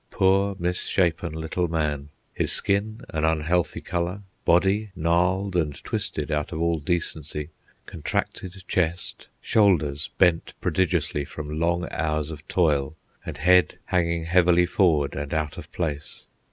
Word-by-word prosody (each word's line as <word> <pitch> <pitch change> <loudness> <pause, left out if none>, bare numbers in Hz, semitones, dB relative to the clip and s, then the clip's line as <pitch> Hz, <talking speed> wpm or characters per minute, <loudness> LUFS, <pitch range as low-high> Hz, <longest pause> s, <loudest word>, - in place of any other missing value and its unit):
Poor, 95 +1 +2
misshapen 90 -1 0
little 80 +3 -2
man! 75 -3 -1 0.2
His - - 0
skin 105 +3 0
an 80 -1 -2
unhealthy 80 +2 +1
colour, 90 +3 -3 0.2
body 95 +5 +3
gnarled 90 +3 +1
and 75 -5 +1
twisted - - -3
out 75 -1 -1
of 80 - -4
all 85 -1 +1
decency, 75 -2 -2 0.4
contracted 90 +3 -4
chest, 90 0 -1
shoulders 80 -10 +2
bent 85 -3 +2
prodigiously 85 -5 0
from 75 +2 -6
long 85 +2 +1
hours 75 -1 -1
of 75 0 -10
toil, 75 -4 +1 0.3
and 80 -3 -5
head 90 +4 +4
hanging 85 -2 0
heavily 90 0 +4
forward 80 -6 +2
and 75 +1 -4
out 75 -1 -1
of - - -11
place! 75 -4 -4
85 Hz, 130 wpm, -25 LUFS, 75-90 Hz, 0.4 s, head